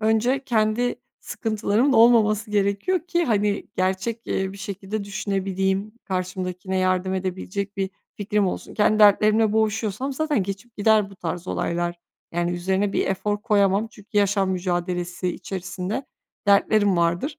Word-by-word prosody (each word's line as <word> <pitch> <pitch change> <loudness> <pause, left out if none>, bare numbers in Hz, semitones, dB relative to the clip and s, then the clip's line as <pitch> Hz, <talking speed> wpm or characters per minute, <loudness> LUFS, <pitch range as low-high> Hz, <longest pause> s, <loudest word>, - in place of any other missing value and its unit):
önce 225 +5 +1
kendi 235 -1 +1 0.3
sıkıntılarımın 220 +4 0
olmaması 220 -2 +4
gerekiyor 205 - +1
ki, 345 -1 +1
hani, 205 -3 0
gerçek, 190 +5 -1
eee, 190 0 -1
bir 195 - -10
şekilde 200 +1 -5
düşünebileyim, 195 0 -1
karşımdakine 185 0 -3
yardım 185 0 +1
edebilecek 190 +2 -4
bir 195 -1 -1 0.3
fikrim 210 -1 0
olsun. 180 - -5
Kendi 215 0 +3
dertlerimle 215 +1 +5
boğuşuyorsam 220 +4 0
zaten 295 -6 0
geçip 200 +5 -7
gider 210 -1 +3
bu 195 - -14
tarz 175 0 -5
olaylar, 175 0 -1 0.4
yani, 175 +1 0
üzerine 190 +3 0
bir - - 0
efor 205 +2 -1
koyamam. 205 -2 +2
Çünkü 210 -2 -17
yaşam 200 -1 +2
mücadelesi 180 0 -2
içerisinde 180 +6 -4 0.4
dertlerim 200 -1 +4
vardır. 170 - 0
200 Hz, 130 wpm, -23 LUFS, 185-215 Hz, 0.4 s, dertlerimle